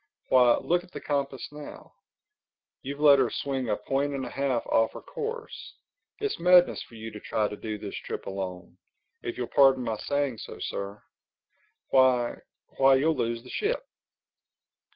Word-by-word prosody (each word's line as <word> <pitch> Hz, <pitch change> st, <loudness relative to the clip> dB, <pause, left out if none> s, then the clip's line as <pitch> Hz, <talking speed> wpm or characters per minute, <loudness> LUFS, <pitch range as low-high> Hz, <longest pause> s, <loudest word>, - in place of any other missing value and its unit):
Why, 125 Hz, -2 st, +6 dB
look 175 Hz, +1 st, 0 dB
at 180 Hz, -, -18 dB
the -, -, -5 dB
compass 140 Hz, -2 st, -2 dB
now: 150 Hz, 0 st, -10 dB, 0.9 s
you've 140 Hz, +2 st, -6 dB
let 145 Hz, -2 st, +7 dB
her 130 Hz, -3 st, +3 dB
swing 135 Hz, -4 st, -3 dB
a 105 Hz, -, +1 dB
point 140 Hz, +6 st, -1 dB
and 135 Hz, -1 st, -3 dB
a -, -, -7 dB
half 135 Hz, -4 st, -1 dB
off 115 Hz, 0 st, +2 dB
her -, -, -8 dB
course. 465 Hz, 0 st, -6 dB, 0.4 s
It's 425 Hz, -1 st, -2 dB
madness 180 Hz, +1 st, +5 dB
for 115 Hz, -, -12 dB
you 110 Hz, 0 st, -7 dB
to 105 Hz, -, -8 dB
try 105 Hz, +1 st, 0 dB
to 105 Hz, -, -6 dB
do 110 Hz, 0 st, -5 dB
this 105 Hz, -1 st, -7 dB
trip -, -, -6 dB
alone—if 95 Hz, +4 st, -8 dB
you'll 125 Hz, -, -1 dB
pardon 135 Hz, 0 st, +4 dB
my 110 Hz, -2 st, -2 dB
saying 140 Hz, -2 st, -1 dB
so, -, -, -8 dB
Sir. 100 Hz, +1 st, -5 dB, 0.9 s
Why—why, 130 Hz, +1 st, +2 dB
you'll 155 Hz, +4 st, +2 dB
lose 115 Hz, 0 st, -2 dB
the 125 Hz, -, -11 dB
ship!" -, -, -1 dB
130 Hz, 160 wpm, -27 LUFS, 115-145 Hz, 0.9 s, let